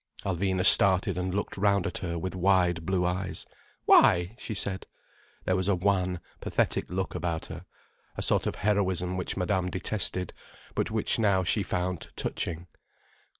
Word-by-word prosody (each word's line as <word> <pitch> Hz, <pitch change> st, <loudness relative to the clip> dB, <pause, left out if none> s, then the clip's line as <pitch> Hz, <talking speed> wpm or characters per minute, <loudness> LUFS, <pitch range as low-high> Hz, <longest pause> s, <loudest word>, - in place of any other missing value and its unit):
Alvina 95 Hz, 0 st, 0 dB
started 95 Hz, -1 st, +5 dB
and 90 Hz, +1 st, -2 dB
looked 100 Hz, -, -3 dB
round 100 Hz, -1 st, +2 dB
at -, -, -3 dB
her 85 Hz, -2 st, -3 dB
with 95 Hz, +3 st, -4 dB
wide 90 Hz, -3 st, +2 dB
blue 95 Hz, -2 st, +1 dB
eyes. 90 Hz, +1 st, -2 dB, 0.4 s
"Why?" 90 Hz, +4 st, +5 dB
she 110 Hz, -, -5 dB
said. 100 Hz, -1 st, -3 dB, 0.6 s
There 95 Hz, -, +2 dB
was 95 Hz, 0 st, -1 dB
a 100 Hz, -, +3 dB
wan, 90 Hz, -1 st, 0 dB, 0.2 s
pathetic -, -, -1 dB
look 95 Hz, +1 st, -3 dB
about 80 Hz, 0 st, -3 dB
her, -, -, -9 dB, 0.5 s
a -, -, -2 dB
sort -, -, +1 dB
of -, -, -2 dB
heroism 95 Hz, -3 st, 0 dB
which 90 Hz, +1 st, -3 dB
Madame 90 Hz, -1 st, 0 dB
detested, 90 Hz, -1 st, -1 dB, 0.4 s
but -, -, -1 dB
which -, -, 0 dB
now 100 Hz, -4 st, +3 dB
she 100 Hz, +4 st, +1 dB
found 90 Hz, -2 st, -3 dB
touching. 85 Hz, 0 st, -3 dB
95 Hz, 155 wpm, -28 LUFS, 90-95 Hz, 0.6 s, started